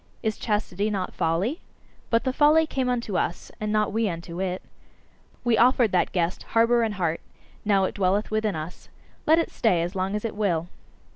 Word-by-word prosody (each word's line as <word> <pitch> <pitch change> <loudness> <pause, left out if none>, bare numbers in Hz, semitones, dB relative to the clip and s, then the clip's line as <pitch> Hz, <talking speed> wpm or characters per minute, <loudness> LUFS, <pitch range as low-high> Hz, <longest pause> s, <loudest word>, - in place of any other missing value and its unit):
Is 220 -2 -1
chastity 210 -2 -1
not 195 -3 -3
folly? 180 - 0 0.5
But 230 0 +2
the 260 -1 0
folly 305 +3 +5
came 260 -5 -1
unto 235 -6 -1
us, 170 - -3
and 210 0 -2
not 215 -1 +1
we 220 -1 +1
unto 170 +1 -6
it. 185 -1 -2 0.8
We 240 -2 +2
offered 245 -2 +4
that 180 - +2
guest 175 -1 -1 0.2
harbour 235 +1 +5
and 220 -2 0
heart: 170 -3 -1 0.4
now 200 -2 +3
it 190 - -1
dwelleth 200 +2 0
with 215 0 0
us 175 -5 -4 0.4
let 320 +2 +6
it 335 - 0
stay 180 -7 +2
as 175 +2 -4
long 190 +1 -1
as 210 - -3
it 225 - -3
will!" 175 -5 0
210 Hz, 190 wpm, -25 LUFS, 180-230 Hz, 0.8 s, let